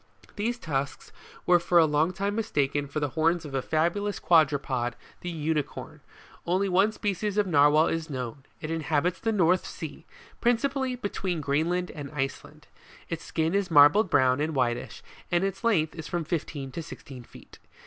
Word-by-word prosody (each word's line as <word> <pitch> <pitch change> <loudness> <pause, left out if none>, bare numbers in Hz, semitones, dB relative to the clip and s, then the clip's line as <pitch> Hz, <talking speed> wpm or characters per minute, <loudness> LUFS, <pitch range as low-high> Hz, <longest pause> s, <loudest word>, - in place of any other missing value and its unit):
These 230 +4 -1
tusks 140 - -4 0.3
were 175 -1 +5
for 175 +1 +2
a 165 - +7
long 155 +3 +2
time 200 +2 -2
mistaken 145 -10 -1
for 140 +2 -3
the 145 -1 -1
horns 165 +3 +1
of 145 - -8
a 135 - 0
fabulous 175 +8 0
quadruped, 140 -7 +2 0.2
the 175 - -5
Unicorn 155 -3 -3 0.4
Only 185 +3 +1
one 190 +3 +3
species 210 -1 -2
of 210 - +3
Narwhal 150 -2 +5
is 165 -1 -2
known: 130 0 -5 0.2
it 155 - -4
inhabits 165 +2 0
the 225 - 0
North 185 -3 +3
Sea, - - -8 0.3
principally 260 +2 +1
be 245 -4 -3
tween 180 -5 -3
Greenland 160 +5 0
and 145 -3 -7
Iceland. 135 -2 -5 0.4
Its 165 -1 -4
skin 160 +1 -1
is 200 -2 0
marbled 160 +6 +6
brown 130 -1 +3
and 155 0 -1
whitish, 120 -2 -1 0.3
and 175 +1 +2
its 195 +2 -3
length 170 -10 +2
is 160 -2 -7
from 175 -1 -2
fifteen 145 -4 -4
to 165 - -5
sixteen 135 -4 -10
feet. 120 - -16
165 Hz, 170 wpm, -27 LUFS, 145-190 Hz, 0.4 s, a